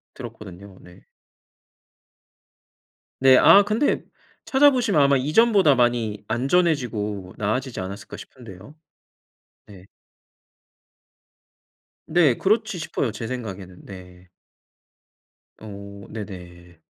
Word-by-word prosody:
들었거든요. 100 -6 -11
네. 90 0 -17 2.2
네 130 -1 +6
아. 200 +9 +7
근데 215 +7 0 0.4
찾아 285 +2 +5
보시면 235 - +1
아마 140 0 +3
이전보다 170 - +3
많이 120 -4 0
안전해지고 120 - -1
나아지지 120 +5 -3
않았을까 95 +2 -8
싶은데요. 115 +1 -13 0.9
네. 95 -2 -16 2.2
네 155 -6 +3
그렇지 215 0 0
싶어요 140 -6 -3
제 115 +1 -7
생각에는 100 -7 -8
네. 90 -1 -13 1.3
어. 100 -1 -10
네네. 90 -5 -10
115 Hz, 200 characters per minute, -22 LUFS, 100-150 Hz, 2.2 s, 아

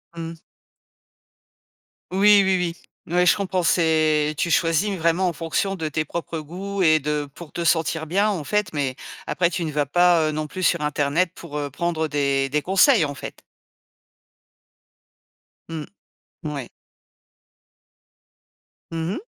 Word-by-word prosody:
Mmh. 165 0 -7 1.7
Oui, 205 +1 +6
oui, 180 -3 +1 0.3
oui. 170 - -7
Ouais, 180 0 +4
je - - +6
comprends, 185 -2 -1
c'est 155 -3 +2
tu 170 - 0
choisis 170 +5 +2
vraiment 170 +3 +1
en 170 - -1
fonction 165 +5 -1
de 160 -3 -3
tes 155 +1 -2
propres 165 +1 -5
goûts 190 +6 -5
et 155 -2 +5
de 150 0 -2
pour 170 -3 -11
te 170 - -4
sentir 160 -1 +1
bien, 200 +5 +2
en 180 -7 -2
fait, 210 +1 -1
mais 135 -3 -1 0.3
après 175 -1 +1
tu 170 - -2
ne 155 - -3
vas 145 -1 0
pas, 175 +1 +3
heu, - - -1
non 155 0 -3
plus 185 +5 -6
sur 170 -3 +2
internet 150 +4 0
pour, 155 -4 -10
heu, 145 -1 -3
prendre 160 +2 -2
des 140 -2 0
des 150 +2 0
conseils, 195 - +4
en 145 - -4
fait. 140 - -9 2.3
Mmh. 160 -2 -5 0.6
Ouais. 140 -5 -4 2.2
Mmh 165 +3 -2
mh. - - -4
165 Hz, 150 wpm, -23 LUFS, 150-180 Hz, 2.3 s, Oui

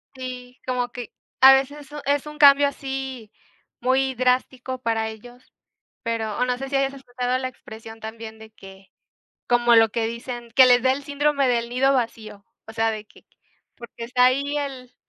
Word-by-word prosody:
Sí, 255 -1 -8
como 250 -1 -1
que 240 -1 -8 0.3
a 265 +1 +10
veces 270 +2 0
eso 295 +1 -10
es 285 0 +1
un 300 0 -9
cambio 285 -1 +7
así 265 -5 -6 0.5
muy 260 +1 +1
drástico 255 +1 -1
para 225 -2 -1
ellos, 245 +3 -14 0.5
pero 225 -3 -3
o 250 - +2
no 250 0 -1
sé 270 +1 -6
si 280 - -3
hayas 275 0 +1
escuchado 250 -2 -3
la 260 0 -3
expresión 225 -2 -12
también 220 0 -9
de 220 0 -12
que 195 -2 -15 0.6
como 240 -1 +4
lo 225 -1 +6
que 225 +1 -1
dicen: 235 0 -7
"Que 260 - +8
le 245 -1 +6
dé 260 +1 +2
el 280 +2 -3
síndrome 285 -1 +1
del 235 -1 0
nido 265 +3 +2
vacío". 220 -5 -4 0.2
O 220 - -11
sea, 225 0 +1
de 215 -1 -7
que, - - -22 0.5
porque 235 0 -10
está 250 +1 +3
ahí 280 +3 +1
el 265 -3 -6
250 Hz, 185 wpm, -23 LUFS, 230-270 Hz, 0.6 s, a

